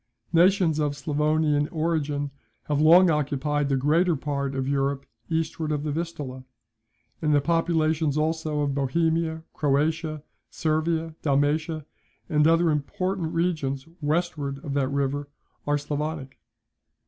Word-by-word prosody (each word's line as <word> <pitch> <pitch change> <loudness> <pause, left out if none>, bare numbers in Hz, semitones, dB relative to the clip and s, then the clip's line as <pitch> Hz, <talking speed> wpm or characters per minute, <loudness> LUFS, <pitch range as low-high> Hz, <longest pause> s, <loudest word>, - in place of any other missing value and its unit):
Nations 175 -2 +4
of 145 -1 0
Sclavonian 150 0 +1
origin 150 -3 -1 0.3
have 150 -1 0
long 170 +3 +7
occupied 145 -1 0
the 135 - +2
greater 160 +6 +3
part 140 -1 -3
of 135 -1 -2
Europe 140 0 0 0.2
eastward 160 -1 -1
of 150 -1 -1
the 150 - -2
Vistula, 145 -5 -4 0.8
and 150 -2 +3
the - - +5
populations 160 -1 +1
also 155 -1 0
of 140 -1 0
Bohemia, 160 +3 0
Croatia, 155 +1 0 0.3
Servia, 160 +1 -1
Dalmatia, 150 +2 +1 0.4
and 150 0 +3
other 165 0 +4
important 165 +4 -2
regions 155 -6 -1
westward 150 -2 -1
of 140 - -3
that 140 -2 +1
river, 140 +1 -1 0.4
are 145 0 +3
Sclavonic. 145 -1 -4
150 Hz, 125 wpm, -25 LUFS, 145-160 Hz, 0.8 s, long